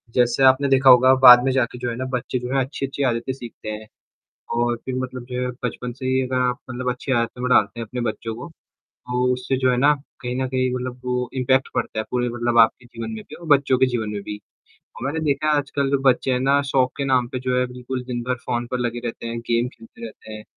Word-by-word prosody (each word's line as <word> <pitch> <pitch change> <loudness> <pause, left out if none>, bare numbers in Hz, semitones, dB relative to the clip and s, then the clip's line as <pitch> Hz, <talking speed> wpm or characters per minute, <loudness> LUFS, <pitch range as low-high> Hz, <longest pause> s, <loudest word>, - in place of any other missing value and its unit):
जैसे 120 +1 +2
आपने 130 +2 +5
देखा 135 0 +5
होगा 130 +1 +7
बाद 125 -1 +10
में 135 - +1
जाके 125 -2 0
जो 120 - -2
है 115 - -4
ना 130 +2 -4
बच्चे 125 0 -3
जो 125 +1 -5
है 135 - +3
अच्छी-अच्छी 135 0 -4
आदतें 120 0 -1
सीखते 120 -4 -9
हैं। 110 0 -6 0.7
और 120 0 +1
फिर 130 - -4
मतलब 130 -1 -5
जो 125 0 -2
है 125 - -1 0.2
बचपन 125 0 -3
से 130 +1 -7
ही 130 0 +2
अगर 130 0 -2
आप 125 - -2
मतलब 125 0 -2
अच्छी 125 +2 -4
आदतों 120 0 -1
में 125 - 0
डालते 120 - +3
हैं 115 - -4
अपने 125 +3 -5
बच्चों 115 -1 -3
को, 120 - -8 0.4
तो 125 0 -2
उससे 125 +1 -2
जो 130 0 +2
है 125 - +1
ना 140 +4 +5 0.3
कहीं 125 0 -4
न 130 0 -1
कहीं 130 0 0
मतलब 125 0 -5
वो 125 0 -1
इम्पैक्ट 130 0 +2
पड़ता - - -2
है 110 - -1
पूरे 125 -1 0
मतलब 120 0 0
आपके 115 +2 +4
जीवन 115 -1 -7
में 110 -1 -6
भी - - -10
और 170 - -11
बच्चों 140 -3 +4
के 130 - +4
जीवन 120 -4 -2
में 105 -1 -4
भी। 105 - -6 0.4
तो 125 - -11
मैंने 145 +4 -2
देखा 145 +1 0
है - - +3
आजकल 140 -1 -1
जो 140 - +2
बच्चे 130 +1 +3
हैं 125 - +1
ना 140 +2 +3
शौक 130 -2 +2
के 140 - -1
नाम 130 -2 +2
पे 130 +1 -5
जो 125 0 -1
है 125 - +2
बिल्कुल 125 +1 -6
दिन-भर 125 0 -2
फ़ोन 120 -1 -1
पर 125 - -1
लगे 120 -1 -2
रहते 115 0 -5
हैं, 115 0 -4
गेम 120 +1 0
खेलते 115 -2 -13
रहते 110 -1 -11
हैं। 105 0 -8
125 Hz, 255 wpm, -22 LUFS, 120-130 Hz, 0.7 s, बाद